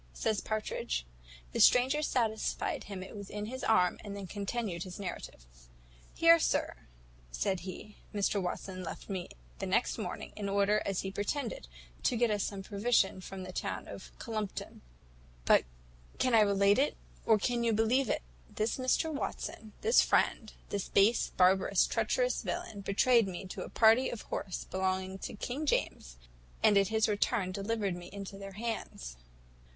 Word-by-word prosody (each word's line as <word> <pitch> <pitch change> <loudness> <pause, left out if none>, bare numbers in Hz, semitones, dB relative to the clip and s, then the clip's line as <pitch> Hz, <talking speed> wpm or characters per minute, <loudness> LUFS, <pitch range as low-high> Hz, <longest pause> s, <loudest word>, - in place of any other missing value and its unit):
says 210 - 0
Partridge. 135 - -2 0.5
The - - -3
stranger 260 +4 +5
satisfied 230 -7 -1
him 195 -2 -6
it 190 - -10
was 200 -2 -8
in 210 0 -4
his 260 +4 -6
arm, 180 -5 +3
and 200 -1 -6
then 200 - -6
continued 200 -1 -3
his 185 +1 -6
narrative. 180 - -6 0.7
"Here, 330 0 +7
sir," 315 - -1 0.4
said 190 - -1
he, 190 +4 -9
"Mr 205 -1 0
Watson 185 +1 -4
left 180 - -7
me 185 -2 -4 0.3
the - - -3
next - - +1
morning, - - -5
in 200 -2 -3
order, 200 +1 +2
as 195 -2 0
he 190 - -4
pretended, 205 - -3 0.3
to 245 - +1
get 235 -1 +3
us 205 -1 0
some 195 -1 -4
provision 200 -1 +1
from 190 0 -7
the 185 - -7
town - - -4
of - - -9
Collumpton; 215 -4 -5 0.6
but - - +5 0.5
can 255 - +1
I 225 - +7
relate 200 +1 +4
it, 285 - +1 0.3
or 220 - +5
can 235 +3 0
you 230 - +2
believe 225 +5 +2
it? - - 0 0.3
this 215 +2 -1
Mr 260 +5 +1
Watson, 220 -6 -5
this 455 +2 +5
friend, 220 -3 +1 0.2
this 200 -2 -3
base, 205 +4 +4
barbarous, 190 +1 +4
treacherous - - 0
villain, 345 - -4
betrayed 225 +3 +3
me 185 +1 -6
to - - -6
a - - -6
party 230 +3 +5
of 235 - -6
horse 185 - -4
belonging 190 0 -2
to - - -6
King 270 +8 -4
James, - - -1 0.5
and 210 - +6
at 200 -1 +5
his 220 +1 +2
return 205 -2 0
delivered 200 -1 -1
me 175 0 -9
into 200 0 -7
their 195 0 -8
hands. 210 - -5
205 Hz, 165 wpm, -32 LUFS, 190-230 Hz, 0.7 s, Here